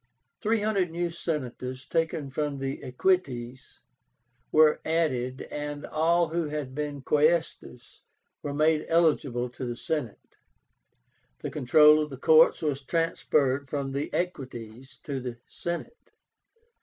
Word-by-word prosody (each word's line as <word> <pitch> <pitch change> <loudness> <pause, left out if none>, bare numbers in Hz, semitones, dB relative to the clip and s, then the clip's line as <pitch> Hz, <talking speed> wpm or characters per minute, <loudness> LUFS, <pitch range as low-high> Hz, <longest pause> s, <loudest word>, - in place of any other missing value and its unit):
Three 220 0 +1
hundred 200 -4 +1
new 170 +1 -2
Senators, 130 -6 -4
taken 160 -4 -1
from 145 0 -2
the 135 0 -4
Equites, 130 -4 -1 0.7
were 155 0 +5
added, 130 -6 -1
and 145 0 -5
all 170 +2 +2
who 165 -1 -1
had 150 -3 -4
been 145 -1 -4
Quaestors 155 +4 0 0.4
were 145 - -4
made 155 +1 +2
eligible 145 -7 +2
to 125 - -8
the 120 -1 -3
Senate. 130 -4 -4 1.0
The - - -4
control 150 +4 +6
of 150 - -3
the 135 - -8
courts 160 +4 +5
was 145 -3 -1
transferred 140 -3 0
from 140 -2 -3
the 140 +2 -2
Equites 130 -7 -5
to 140 -4 -3
the 125 -2 -6
Senate. 175 - -6
150 Hz, 125 wpm, -27 LUFS, 130-165 Hz, 1.0 s, control